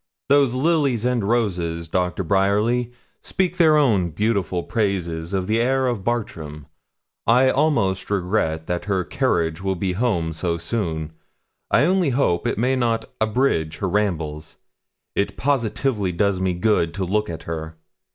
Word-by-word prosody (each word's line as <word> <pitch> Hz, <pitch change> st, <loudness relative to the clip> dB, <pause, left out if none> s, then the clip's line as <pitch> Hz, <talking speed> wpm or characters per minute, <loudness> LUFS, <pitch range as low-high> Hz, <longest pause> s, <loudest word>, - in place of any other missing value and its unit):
Those 140 Hz, -3 st, +4 dB
lilies 140 Hz, -5 st, +1 dB
and 125 Hz, -3 st, +1 dB
roses, 90 Hz, -8 st, -1 dB
Doctor 90 Hz, +3 st, -1 dB
Bryerly, 105 Hz, +6 st, +1 dB, 0.3 s
speak 185 Hz, -1 st, -1 dB
their 155 Hz, -3 st, +5 dB
own 105 Hz, -12 st, +3 dB
beautiful 95 Hz, -1 st, -1 dB
praises 90 Hz, -7 st, -2 dB
of 95 Hz, -2 st, -1 dB
the 110 Hz, +4 st, +1 dB
air 130 Hz, +2 st, +2 dB
of 120 Hz, -6 st, -1 dB
Bartram. 80 Hz, -11 st, -3 dB, 0.6 s
I 125 Hz, +3 st, +5 dB
almost 110 Hz, -11 st, +1 dB
regret 90 Hz, -5 st, 0 dB
that 90 Hz, +1 st, -3 dB
her 95 Hz, -3 st, 0 dB
carriage 80 Hz, 0 st, 0 dB
will 95 Hz, 0 st, -1 dB
be 95 Hz, +1 st, -1 dB
home 90 Hz, -7 st, 0 dB
so 85 Hz, +1 st, -1 dB
soon. 80 Hz, -4 st, -3 dB, 0.6 s
I -, -, +4 dB
only 180 Hz, -2 st, +2 dB
hope 120 Hz, -10 st, +1 dB
it -, -, -1 dB
may 125 Hz, +4 st, +2 dB
not 115 Hz, -3 st, -1 dB
abridge 110 Hz, -, +1 dB
her 95 Hz, -, -2 dB
rambles. 85 Hz, -6 st, -2 dB, 0.6 s
It 100 Hz, -, -1 dB
positively 120 Hz, -6 st, 0 dB
does 100 Hz, +2 st, +1 dB
me 95 Hz, -1 st, 0 dB
good 90 Hz, -4 st, +1 dB
to 95 Hz, -1 st, -2 dB
look 105 Hz, +3 st, 0 dB
at 80 Hz, -, -6 dB
her. 80 Hz, -1 st, -6 dB
100 Hz, 150 wpm, -22 LUFS, 85-120 Hz, 0.6 s, their